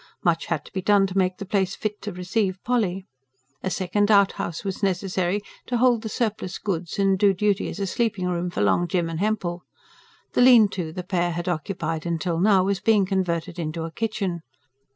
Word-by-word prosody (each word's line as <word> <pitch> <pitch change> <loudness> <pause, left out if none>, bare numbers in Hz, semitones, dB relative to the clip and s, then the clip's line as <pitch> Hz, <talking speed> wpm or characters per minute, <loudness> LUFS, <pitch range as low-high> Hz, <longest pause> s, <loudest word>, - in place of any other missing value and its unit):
Much 170 -2 +1
had 160 -4 -2
to - - -15
be 190 - -2
done 200 +1 +4
to 190 -1 -5
make 185 -1 +1
the 200 - -6
place 195 -1 0
fit 210 -1 -4
to 210 - -5
receive 185 +2 -1
Polly. 200 -6 0 0.6
A 190 - -2
second 200 +3 0
outhouse 200 -5 +2
was 195 -1 -4
necessary, 190 0 0 0.3
to 245 - 0
hold 240 -2 +3
the 220 - -5
surplus 215 -5 -2
goods 180 -2 -3
and 195 -1 +2
do 200 -1 +4
duty 205 +1 +1
as - - -7
a 200 - 0
sleeping 205 -2 -1
room 175 0 -1
for 175 - -3
Long 175 +12 +2
Jim 170 -1 0
and 165 -1 -4
Hempel: 190 -4 -1 0.7
the - - +3
lean 245 -4 +7
to 175 -5 -4
the 180 +2 -5
pair 175 -1 0
had 175 +1 -4
occupied 165 -1 -2
till 165 0 -1
now 195 0 +4
was 195 0 0
being 210 -3 +3
converted 175 -3 -2
into 160 0 -3
a 165 - -5
kitchen. 195 -3 -2
190 Hz, 200 wpm, -24 LUFS, 175-205 Hz, 0.7 s, lean